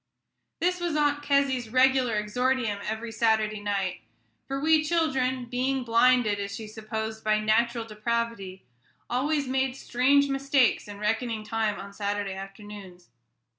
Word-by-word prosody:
This 360 +2 +1
was 345 -3 -2
Aunt 290 -1 +2
Kezzy's 280 -4 +1
regular 255 -1 +3
exordium 230 0 0
every 225 +1 -4
Saturday 220 -1 +1
night; 195 - -2 0.5
for 270 0 -3
we 310 +1 +4
children, 265 -6 0
being 255 +2 -1
blinded, 235 -2 +3
as 200 0 -4
she 220 - -7
supposed, 220 0 -5
by 215 0 +2
natural 230 +2 +1
depravity, 220 - -3 0.5
always 280 +3 0
made 265 0 0
strange 270 +2 +2
mistakes 275 -4 +2
in 205 -1 -8
reckoning 220 +1 -1
time 220 -1 -1
on 200 0 -9
Saturday 200 -1 -2
afternoons. 195 - -10
235 Hz, 135 wpm, -27 LUFS, 210-265 Hz, 0.5 s, we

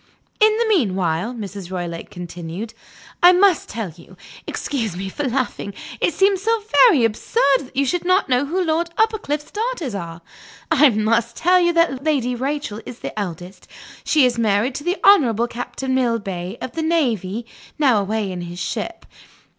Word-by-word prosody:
"In 430 0 +5
the 470 - +1
meanwhile," 195 - 0
Mrs. 200 -4 -7
Roylake 175 -2 -5
continued, 175 +4 -7 0.5
"I 355 +1 +8
must 365 -2 +3
tell 220 -6 -4
you 180 +2 -16 0.3
excuse 225 - -3
me 190 +1 -4
for 290 +9 -4
laughing; 240 -6 -3 0.2
it 345 - 0
seems 390 -1 +3
so 450 +1 0 0.2
very 295 - +4
absurd 270 - +2
that 270 -1 -12
you 280 +1 +2
should 355 +6 -1
not 365 +2 +2
know 255 +1 +1
who 365 +5 0
Lord 330 +1 0
Uppercliff's 420 -10 0
daughters 430 - -3
are 170 -3 -6 0.5
I 300 -2 +6
must 225 +1 0
tell 365 +2 +4
you 345 -1 +3
that 335 -6 +1
Lady 275 -6 +1
Rachel 260 -4 -3
is 240 - -9
the - - -6
eldest. 180 -1 -7 0.4
She 300 -4 +4
is 240 -2 0
married 220 +3 +1
to 290 - -6
the 355 +4 0
Honorable 245 - +5
Captain 245 +2 -4
Millbay, 210 -6 -1
of 255 - -5
the 325 - -4
Navy, 240 - 0 0.3
now 260 -8 +4
away 205 0 -2
in 180 -1 -5
his 175 0 -7
ship. 220 - -4
250 Hz, 170 wpm, -21 LUFS, 200-325 Hz, 0.5 s, I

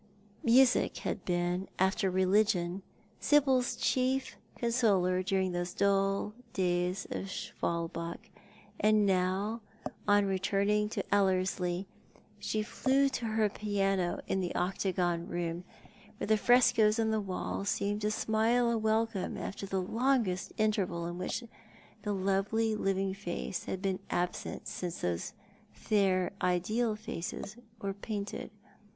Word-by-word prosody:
Music 245 +2 +4
had - - -2
been, 175 +1 0
after 190 +1 +2
religion, 185 -1 +2 0.4
Sibyl's 265 -4 +3
chief 260 +1 0 0.2
consoler 205 -7 +2
during 190 0 0
those 175 +1 -3
dull 195 +1 +1 0.2
days 180 0 0
at 195 - -4
Schwalbach, 170 +3 -4 0.5
and 215 0 +4
now, 195 +4 +1 0.5
on 205 0 +5
returning 200 +2 +1
to - - -2
Ellerslie, 185 -2 +1 0.5
she 215 0 -1
flew 275 +5 +2
to 245 -3 -3
her 220 -1 +2
piano 195 -3 0
in 190 - 0
the 180 -2 -2
octagon 180 -2 0
room, 175 0 -3 0.5
where - - -3
the 215 +1 +4
frescoes 240 -1 +4
on 220 -1 +2
the 220 -1 +1
walls 195 +1 -3
seemed 205 +1 -1
to 210 - +1
smile 225 +3 +2
a 230 - +1
welcome 220 -2 0
after 195 0 -5
the 190 -1 -1
longest 225 -3 +1
interval 195 -6 0
in 175 +1 -5
which 185 +6 -3 0.6
the 210 0 -2
lovely 200 +3 +1
living 195 -1 0
face 190 -2 -4
had 190 +1 -4
been 190 -1 0
absent 175 0 -2
since 175 -2 -4
those 85 -1 -2 0.4
fair 190 -3 +1
ideal 210 +6 +1
faces 215 -2 -6 0.2
were 195 0 -3
painted. 205 0 -5
195 Hz, 125 wpm, -31 LUFS, 185-220 Hz, 0.6 s, on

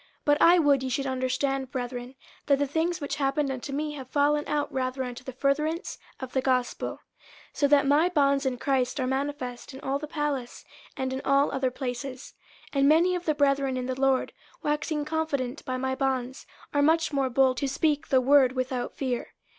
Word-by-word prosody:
50:001:012 - - -30 0.2
But 290 0 +3
I 345 +2 +7
would 290 -5 +4
ye 260 - -3
should 275 +2 -1
understand, 265 0 -1
brethren, 250 0 -5 0.3
that 280 -1 +4
the 285 - +1
things 325 +5 -1
which 285 0 -3
happened 275 0 0
unto 265 +2 -5
me 300 +2 -2
have 270 -4 -8
fallen 295 +1 +2
out 295 -1 -1
rather 260 0 -1
unto 250 0 -7
the 260 - -6
furtherance 300 +6 -1 0.2
of 260 -1 -7
the 265 - +1
gospel; 255 -2 0
50:001:013 - - -9 0.5
So 285 - +2
that 280 0 +4
my 295 +5 +4
bonds 280 -4 +2
in 255 -1 -1
Christ 260 +1 0
are 260 - 0
manifest 265 -1 -3
in - - -8
all 275 +1 -1
the 300 - -6
palace, 290 -5 -3 0.3
and 260 0 -2
in 265 - -3
all 275 +1 +3
other 265 -1 0
places; 255 +1 -6 0.4
50:001:014 280 - -1
And 275 +1 +5
many 340 +4 +4
of 355 -1 -3
the 310 - +1
brethren 275 -2 +2
in 250 - -3
the 260 +1 -4
Lord, 270 -1 +2 0.3
waxing 300 0 -1
confident 300 -5 -2
by 255 0 -2
my 260 0 -1
bonds, 260 -1 -2 0.3
are 290 - +3
much 320 +1 +3
more 270 -2 +1
bold 260 0 +3
to 280 - -1
speak 295 +2 0
the 260 - +4
word 265 -1 +5
without 255 -1 -3
fear. 255 -3 -3
275 Hz, 205 wpm, -27 LUFS, 260-290 Hz, 0.5 s, I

